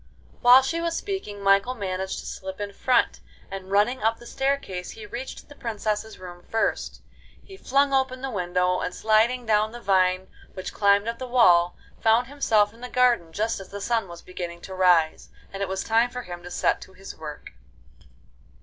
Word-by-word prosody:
While 250 +1 +8
she 335 +5 -1
was 335 0 -1
speaking 210 - -5
Michael 200 +6 +3
managed 190 -3 -3
to - - -13
slip 190 +1 -7
in 205 -1 -4
front, 250 +3 +2 0.3
and 190 -1 -7
running 210 +6 +2
up 225 +1 +1
the 240 - -14
staircase, 265 -10 -2
he 220 - -9
reached 240 +5 -7
the 290 - -13
princesses' 220 -3 -3
room 175 -1 -10
first. 225 - -1 0.4
He 390 - -12
flung 280 -5 +1
open 265 -1 0
the 270 - -3
window, 180 -2 0
and 180 - -3
sliding 225 +3 +2
down 215 0 +2
the 240 - -7
vine 185 -2 +2 0.3
which 185 -1 -6
climbed 200 +1 +3
up 230 0 -3
the 255 - -5
wall, 180 -8 +4 0.2
found 225 +2 +3
himself 225 -6 +2
in 230 - -18
the 250 - -6
garden 240 -11 +2
just 220 +5 -1
as 195 - -10
the 200 - -7
sun 225 0 0
was 170 -1 -11
beginning 175 -2 -7
to 190 - -8
rise, 175 -4 +3 0.2
and 195 - -5
it 195 - -1
was 190 0 -2
time 230 +2 +3
for 250 0 -6
him 175 -1 -8
to 175 - -9
set - - 0
to 190 - -12
his 195 +1 -10
work. 150 -2 -9
210 Hz, 195 wpm, -25 LUFS, 185-245 Hz, 0.4 s, While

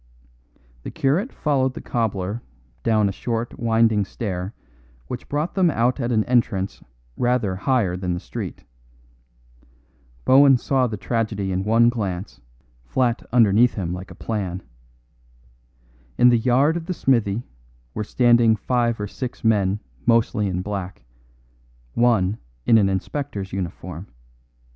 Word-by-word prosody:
The - - -6
curate 165 - 0
followed 130 -4 0
the - - -5
cobbler 105 -2 -2 0.4
down 110 - +2
a - - 0
short 115 +3 -4
winding 115 -2 +3
stair 95 -1 -5 0.5
which 120 - -7
brought 150 +4 -1
them 185 -3 +3
out 125 -1 +1
at 120 -1 -1
an 110 -2 +2
entrance 105 -6 0 0.4
rather 120 -6 +1
higher 105 -3 +1
than 90 -1 -2
the - - -4
street. - - -7 1.6
Bohun 135 0 +7
saw 130 +1 +1
the 110 -2 -5
tragedy 105 -2 -2
in 95 +1 -1
one 115 +3 +4
glance, 100 -5 -4 0.4
flat 120 - 0
underneath 115 0 +4
him 90 -4 -3
like 90 +2 -7
a - - -11
plan. 95 -5 -4 1.5
In 125 0 +6
the 120 -1 +4
yard 130 +7 +3
of 170 -1 -5
the 180 - -2
smithy 115 -6 +1 0.5
were 105 - -3
standing 120 0 +4
five 120 0 0
or 105 - -2
six 125 +4 -6
men 105 -3 +2 0.3
mostly 115 -2 +2
in 90 -1 -2
black, 95 -10 -5 0.9
one 110 -4 +2 0.3
in 115 - +6
an 100 -2 +3
inspector's 100 0 -4
uniform. 90 -1 -5
115 Hz, 135 wpm, -22 LUFS, 95-125 Hz, 1.6 s, Bohun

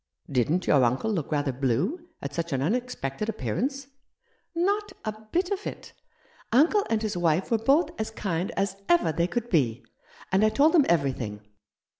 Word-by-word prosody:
Didn't 145 +8 +1
your 140 -3 +4
uncle 125 - +1
look 165 -9 -2
rather 145 -2 +1
blue 140 - -1
at 140 0 -4
such 170 0 -3
an 130 - 0
unexpected 215 - -2
appearance? 270 +5 -2 0.3
" - - -46
" - - -46 0.2
Not 415 0 -3
a 215 - 0 0.2
bit 360 +2 0
of 400 0 -2
it! - - -8 0.6
Uncle 325 - +4
and 225 -1 0
his 215 -3 -2
wife 175 +2 +1
were 230 - +3
both 275 +9 +3
as 220 - -2
kind 185 -5 -2
as 195 0 0
ever 170 -1 +4
they 170 +2 0
could 240 +4 -3
be; 130 - +1 0.5
and 190 +2 +3
I 215 - +5
told 290 +7 +4
them 310 -6 +5
everything. 130 -10 0
190 Hz, 180 wpm, -27 LUFS, -, 0.6 s, I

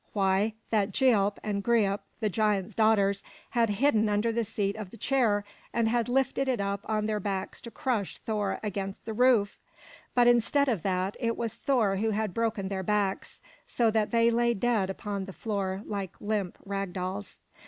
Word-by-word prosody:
Why, 200 +2 +2 0.2
that 210 -2 +2
Gialp 205 -4 +3
and 200 -2 -2
Greip, 205 -4 +2 0.2
the 215 - +1
giant's 205 -2 0
daughters, 200 -3 +3 0.3
had 235 -2 +2
hidden 220 0 +2
under 210 +3 +1
the 230 +1 0
seat 200 -2 -2
of 215 -4 -6
the 230 - -12
chair, 220 -5 +1 0.3
and 230 -1 +2
had 235 +1 +1
lifted 270 +1 +1
it 255 -4 +1
up 200 0 -1
on 215 -1 0
their 215 -1 0
backs 195 -1 -4
to 235 - -8
crush 230 -5 -2
Thor 210 -3 -2
against 195 -2 -4
the 220 - -4
roof! 235 -3 +3 0.6
But 245 -1 +5
instead 240 +4 +4
of 225 -9 0
that, 185 +2 -1
it 230 -2 -1
was 230 -2 -2
Thor 225 -8 +1
who 220 +3 +1
had 215 -2 -1
broken 225 -3 -1
their 195 -1 -2
backs, 200 0 -1 0.2
so 230 -2 +2
that 215 -1 +1
they 230 0 +3
lay 235 0 +2
dead 215 -3 +1
upon 200 0 -4
the 195 - -9
floor 200 -2 -3
like 200 -3 -5
limp 205 -4 -2
rag 195 -2 -3
dolls. 190 +2 -5
210 Hz, 185 wpm, -28 LUFS, 195-230 Hz, 0.6 s, But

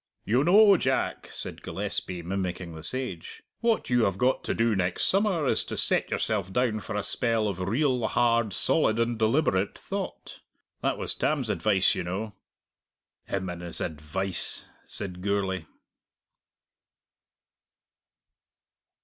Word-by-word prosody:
"You 125 +6 +3
know, 200 +3 +7
Jack," 130 -3 -1
said - - -5
Gillespie, 90 -2 -3
mimicking 90 -1 -3
the 80 - -8
sage, 95 -1 -5 0.2
"what 230 - 0
you 120 -2 +4
have 95 -1 0
got 130 +5 +1
to - - -1
do 115 -1 +2
next 90 -1 0
summer 195 -5 +2
is - - +2
to - - -5
set - - +2
yourself 100 -4 -1
down 120 -1 +1
for 105 - -5
a 105 - -1
spell 115 -3 +1
of 95 -3 -3
real, 120 +5 +1
hard, 115 -2 +2
solid, 110 +2 +2
and 115 0 0
deliberate 110 -4 +1
thought. - - -6 0.4
That - - 0
was - - -1
Tam's 135 -8 0
advice, 100 -3 +3
you 95 - -3
know." 100 +5 -4 0.9
"Him 95 -1 -2
and 90 -1 -5
his 85 -1 -3
advice!" 80 +4 -2 0.2
said 90 -3 -1
Gourlay. 95 -3 -1
105 Hz, 135 wpm, -27 LUFS, 95-125 Hz, 0.9 s, know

